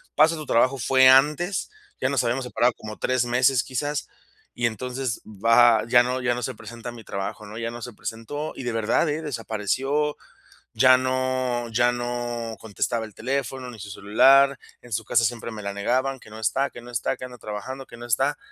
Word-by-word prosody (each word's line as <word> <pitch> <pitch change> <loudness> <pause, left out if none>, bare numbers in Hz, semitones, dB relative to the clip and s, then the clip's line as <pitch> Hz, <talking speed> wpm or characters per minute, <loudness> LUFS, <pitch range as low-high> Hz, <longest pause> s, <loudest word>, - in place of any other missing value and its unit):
pasa 160 +2 +5
a - - -7
tu 155 - -6
trabajo 130 +2 +3
fue 130 +1 +5
antes, 150 +8 +3 0.3
ya - - +2
nos 135 -3 +1
habíamos 120 +2 -1
separado 125 0 +2
como 110 0 -8
3 130 -1 +1
meses 125 0 +3
quizás, 145 +4 -3 0.5
y 120 - -1
entonces 125 +2 -3
va 115 +2 +4
ya 120 0 +6
no 125 +1 -2
ya 120 -1 +1
no 125 - -4
se 130 - -3
presenta 115 +2 -9
a - - -6
mi 120 -1 -11
trabajo. 100 +1 -5
¿no? 105 +2 -9
Ya 115 0 -3
no 120 0 -8
se 120 -1 -7
presentó 115 +9 -5
y - - -7
de 120 - -2
verdad, 115 +8 +1
eh, 150 +2 -2
desapareció, 135 +3 -1 0.6
ya 130 0 +6
no 130 -2 -1
ya 120 +2 +3
no 120 -1 -3
contestaba 110 +1 -2
el 110 - -13
teléfono 130 +1 -3
ni 120 - -10
su 100 +1 -8
celular, 135 +8 +5 0.2
en 120 - -15
su 115 - -1
casa 115 0 +3
siempre 115 0 -3
me 110 -1 -7
la 100 0 -3
negaban, 130 +6 0
que 110 - -16
no 110 - -9
está, 135 +5 0
que - - -10
no 120 - -11
está, 115 - -1
que - - -7
ando 125 -1 -10
trabajando, 110 +6 -6
que 120 - -12
no 120 - -8
está. 115 - +1
120 Hz, 210 wpm, -24 LUFS, 115-130 Hz, 0.6 s, ya